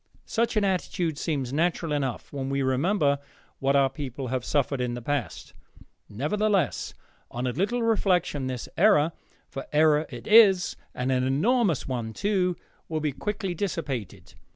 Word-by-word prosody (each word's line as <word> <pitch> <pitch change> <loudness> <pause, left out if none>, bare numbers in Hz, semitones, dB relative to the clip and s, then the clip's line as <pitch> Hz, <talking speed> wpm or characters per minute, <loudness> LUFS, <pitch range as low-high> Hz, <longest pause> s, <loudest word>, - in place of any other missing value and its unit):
Such 230 0 0
an 210 - +3
attitude 175 -5 -1
seems 135 -6 -2
natural 165 +1 0
enough 140 -3 -2
when 135 -1 -3
we 140 0 0
remember 140 +2 +2 0.4
what 135 +1 +2
our 140 -1 +5
people 135 -2 -6
have 130 -1 -2
suffered 140 -1 0
in 120 -1 -1
the 120 - -6
past. 145 -3 -3 0.6
Nevertheless, 185 - 0 0.3
on 120 +1 -4
a 125 - 0
little 220 - 0
reflection, 185 -11 +1
this 125 -2 -4
error 170 -5 +5 0.4
for 135 - -7
error 150 0 +4
it 120 -4 -9
is, 205 -5 +6 0.2
and 125 +1 -1
an 130 -1 +2
enormous 175 - +1
one, 120 -4 -3
too 190 - 0 0.3
will 160 -1 -1
be 150 -1 -1
quickly 200 +5 -3
dissipated. 155 - -4
150 Hz, 155 wpm, -26 LUFS, 130-190 Hz, 0.6 s, is